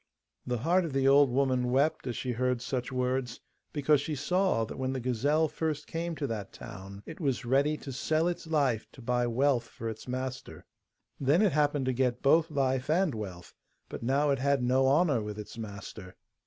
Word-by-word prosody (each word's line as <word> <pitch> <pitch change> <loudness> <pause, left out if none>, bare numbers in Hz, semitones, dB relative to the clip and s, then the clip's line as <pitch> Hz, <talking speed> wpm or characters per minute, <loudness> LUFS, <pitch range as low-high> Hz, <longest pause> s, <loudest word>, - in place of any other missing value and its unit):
The 125 -1 0
heart 170 +10 +2
of 160 -5 -4
the 135 0 +2
old 140 0 +6
woman 130 -1 +1
wept 135 +2 +1
as 120 - -3
she 130 - -2
heard 125 +1 0
such 125 +1 -3
words, 125 -1 -1 0.3
because 145 -1 +3
she 155 +1 -3
saw 180 -5 +1
that 110 - -8
when 130 0 -1
the 130 - -2
gazelle 135 +6 +1
first 155 -1 -3
came 165 0 -3
to 150 - -3
that 105 -6 -4
town 100 +1 -10
it 160 - -9
was 135 -6 -1
ready 140 +5 +2
to 140 - -8
sell 155 +5 0
its 175 -1 -3
life 140 -8 +1
to 130 - -13
buy 120 0 +1
wealth 125 0 +2
for 115 - -7
its 110 +2 -8
master. 130 +1 -5 0.5
Then 145 +9 +3
it 205 - +4
happened 145 -2 +1
to 130 - +1
get 125 -1 0
both 160 +4 +4
life 135 -2 0
and 170 -1 +2
wealth, 95 -6 -7 0.4
but - - -7
now 140 +5 +2
it 135 - +1
had 140 -1 +1
no 130 +2 +3
honour 145 -3 +3
with 105 0 -5
its 105 - -8
master. 100 -3 -8
130 Hz, 200 wpm, -29 LUFS, 120-150 Hz, 0.5 s, old